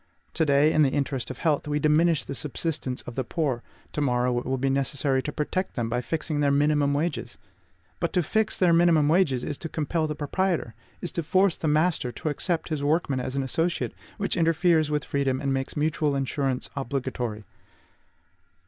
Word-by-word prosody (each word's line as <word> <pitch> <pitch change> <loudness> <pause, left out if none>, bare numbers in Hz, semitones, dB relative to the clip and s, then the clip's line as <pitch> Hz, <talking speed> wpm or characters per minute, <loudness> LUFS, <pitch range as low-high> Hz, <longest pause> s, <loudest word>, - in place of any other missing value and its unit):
To 160 -2 +1
day, 145 +2 +4
in 155 - +4
the 140 - +5
interest 135 -2 -2
of 130 - -6
health, 150 -1 0
we 150 0 0
diminish 155 +2 +3
the - - -6
subsistence 145 -2 -3
of 120 - -8
the 130 - -2
poor; 130 -2 -1 0.3
to 150 - -1
morrow 125 -2 +1
it - - -7
will 130 0 0
be 135 +2 0
necessary 135 0 +1
to 150 - -4
protect 185 +6 -2
them 115 -2 -1
by 120 +1 0
fixing 155 +2 -2
their 145 -1 +3
MINIMUM 145 0 +2
wages. 145 -5 -2 0.6
But 170 - -1
to 180 - +2
fix 220 +7 0
their 180 -3 +4
minimum 165 -3 +4
wages 155 -7 +2
is 145 - -4
to 165 - -5
compel 155 +1 -1
the 150 - -3
proprietor, 165 -3 -1 0.3
is 175 - -3
to 170 - -2
force 185 +3 +3
the 160 - -3
master 150 -4 +2
to 155 - -3
accept 165 +3 -1
his 155 -3 -2
workman 145 -3 +1
as 130 +1 -4
an 135 - 0
associate, 165 +6 -1 0.2
which 200 -1 -1
interferes 165 -2 +3
with 150 -1 -1
freedom 135 -2 0
and 140 -1 -1
makes 135 +2 -3
mutual 150 -1 +1
insurance 135 -1 -1
obligatory. 125 -5 -3
145 Hz, 195 wpm, -26 LUFS, 135-160 Hz, 0.6 s, the